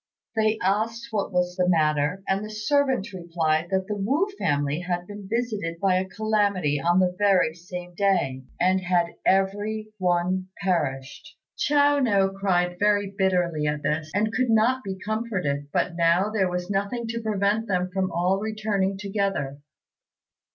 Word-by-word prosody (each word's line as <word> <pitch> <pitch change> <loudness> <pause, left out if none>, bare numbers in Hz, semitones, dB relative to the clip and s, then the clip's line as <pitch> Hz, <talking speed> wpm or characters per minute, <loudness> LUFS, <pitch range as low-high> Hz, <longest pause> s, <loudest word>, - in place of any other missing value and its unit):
They 220 0 +2
asked 225 +5 0
what 205 -2 -1
was 180 -1 0
the 180 -1 +1
matter, 155 +1 +1
and 195 +2 0
the 215 - -6
servant 235 0 0
replied 165 -2 -1
that 190 -1 0
the 210 +1 -3
Wu 270 - +1
family 145 0 0
had 175 0 -3
been 205 0 -9
visited 215 -8 -2
by 190 -1 +3
a 190 0 -2
calamity 200 -9 0
on 175 +2 +3
the 180 -1 +2
very 195 -6 +3
same 180 +1 -8
day, 175 -9 +1 0.2
and 185 +1 +3
had 180 -2 +1 0.2
every 205 +3 +1
one 180 +1 +1 0.2
perished. 140 -8 -2 0.2
Chiao 290 0 +3
no 200 -7 +3
cried 180 -2 0
very 205 -1 +2
bitterly 175 -6 +1
at 150 0 -2
this, 155 +1 -1
and 215 +2 +1
could 255 0 +1
not 235 +4 +3
be 190 -1 -5
comforted; 190 -9 -2
but 170 - 0
now 170 +4 +3
there 195 -4 +1
was 180 0 -3
nothing 200 +4 -2
to 230 0 -3
prevent 215 +1 0
them 180 -2 0
from 190 -1 0
all 180 +3 +1
returning 210 -3 -1
together. 195 -9 -2
190 Hz, 160 wpm, -25 LUFS, 175-215 Hz, 0.2 s, by